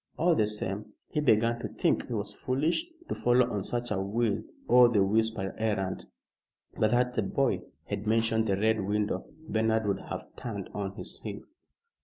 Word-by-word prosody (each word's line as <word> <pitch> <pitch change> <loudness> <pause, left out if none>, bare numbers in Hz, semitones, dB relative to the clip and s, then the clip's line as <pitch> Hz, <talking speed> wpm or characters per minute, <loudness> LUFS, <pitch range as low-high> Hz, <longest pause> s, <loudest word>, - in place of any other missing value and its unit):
All 175 +1 +4
the 110 -9 +2
same, 105 0 -4 0.2
he - - -1
began 115 -4 +3
to - - -3
think - - 0
he - - -4
was - - -3
foolish 155 - 0 0.2
to - - -2
follow 120 0 +3
on 100 -2 -1
such 120 +2 -2
a 95 -2 0
will 110 +1 0 0.3
o' 125 0 +8
the 105 -4 +3
wisp 110 +3 +2
errand. 95 -1 -2 0.7
But 110 - +3
that 125 +1 +2
the 110 - +1
boy 135 +6 +1 0.2
had 105 - -4
mentioned 110 0 +2
the 100 -2 +2
Red 110 +1 +2
Window, 105 +1 -1 0.2
Bernard 110 0 +1
would 100 -1 0
have - - -7
turned 100 -6 -5
on 100 -2 -3
his - - -6
heel. 105 -2 -6
110 Hz, 180 wpm, -29 LUFS, 100-120 Hz, 0.7 s, o